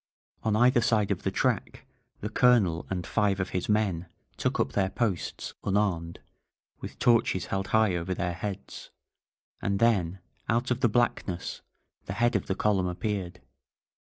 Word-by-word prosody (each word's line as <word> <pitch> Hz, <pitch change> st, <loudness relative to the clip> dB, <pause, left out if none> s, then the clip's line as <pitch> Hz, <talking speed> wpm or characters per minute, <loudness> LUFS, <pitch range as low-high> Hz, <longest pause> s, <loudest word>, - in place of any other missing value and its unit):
On 110 Hz, -1 st, +1 dB
either 120 Hz, +2 st, +5 dB
side 110 Hz, -3 st, +2 dB
of -, -, -1 dB
the -, -, 0 dB
track -, -, -1 dB, 0.4 s
the 105 Hz, -, -3 dB
Colonel 110 Hz, -8 st, +3 dB
and 90 Hz, -2 st, -3 dB
five 100 Hz, -3 st, +1 dB
of 95 Hz, -, -1 dB
his 90 Hz, -, -2 dB
men 100 Hz, -5 st, +1 dB, 0.3 s
took -, -, -1 dB
up 70 Hz, -, +1 dB
their 95 Hz, +5 st, +1 dB
posts, 105 Hz, -6 st, -2 dB
unarmed, 95 Hz, -5 st, 0 dB, 0.6 s
with -, -, -8 dB
torches 115 Hz, -6 st, +3 dB
held 95 Hz, 0 st, -2 dB
high 110 Hz, -4 st, +3 dB
over 85 Hz, +2 st, -2 dB
their 90 Hz, 0 st, -1 dB
heads. 100 Hz, +2 st, -6 dB, 0.7 s
And 100 Hz, 0 st, 0 dB
then, 100 Hz, -5 st, +2 dB, 0.3 s
out 120 Hz, +3 st, +1 dB
of 125 Hz, -, +1 dB
the 130 Hz, -, +4 dB
thick 105 Hz, -, -5 dB
blackness, 100 Hz, -7 st, 0 dB, 0.4 s
the -, -, -4 dB
head 120 Hz, 0 st, +2 dB
of 100 Hz, -, 0 dB
the 95 Hz, -, 0 dB
column 100 Hz, -3 st, +1 dB
appeared. 90 Hz, -2 st, -3 dB
100 Hz, 160 wpm, -28 LUFS, 90-110 Hz, 0.7 s, either